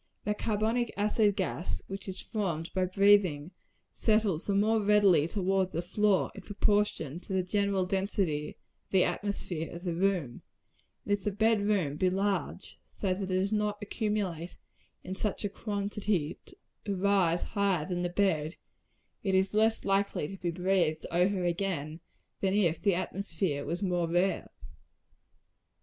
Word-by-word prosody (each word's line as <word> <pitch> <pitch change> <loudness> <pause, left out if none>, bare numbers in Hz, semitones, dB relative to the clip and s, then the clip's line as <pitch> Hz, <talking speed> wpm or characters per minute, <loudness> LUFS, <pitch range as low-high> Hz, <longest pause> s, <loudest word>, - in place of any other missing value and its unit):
The 210 - 0
carbonic 220 +3 0
acid 205 0 +2
gas 185 -3 -2
which 195 +1 -7
is 190 - -5
formed 175 -7 -3
by 185 -1 +1
breathing, 185 -5 +3 0.4
settles 215 -7 +1
the 200 - +1
more 215 +2 +3
readily 200 -7 +4
towards 190 -1 0
the 170 - -2
floor, 200 +2 +2
in 200 - -9
proportion 205 -7 0
to 185 - -7
the 190 -1 +1
general 200 0 +1
density 190 -5 0 0.4
of - - -45
the 190 -2 +4
atmosphere 175 -3 -2
of 170 +1 -8
the 175 -2 -1
room; 175 -8 0 0.6
and 205 - +1
if 200 -2 -1
the - - +1
bed 220 +1 +2
room 190 -9 0
be 185 +3 +3
large, 195 -1 -2 0.2
so 190 -3 +1
that 190 - -5
it 195 - -2
does 185 +2 0
not 210 -1 0
accumulate 205 -5 -3 0.5
in 185 - -5
such 205 +1 -2
a - - 0
quantity 200 -5 -2
as - - -14 0.3
to 200 -2 -1
rise 185 -3 +2
higher 200 -7 0
than 180 -1 -2
the 175 - -1
bedstead, 175 -4 0 0.7
it 190 -2 0
is 190 +1 +2
less 220 +1 +2
likely 195 -6 +1
to 195 - -9
be 175 - 0
breathed 175 -2 +1
over 180 +2 +2
again, 170 -3 -2 0.4
than 195 0 +1
if 170 -6 +2
the 200 -4 +3
atmosphere 175 -5 -2
were 165 +4 -2
more 175 -3 +1
rare. 175 +3 +1
190 Hz, 160 wpm, -30 LUFS, 175-205 Hz, 0.7 s, readily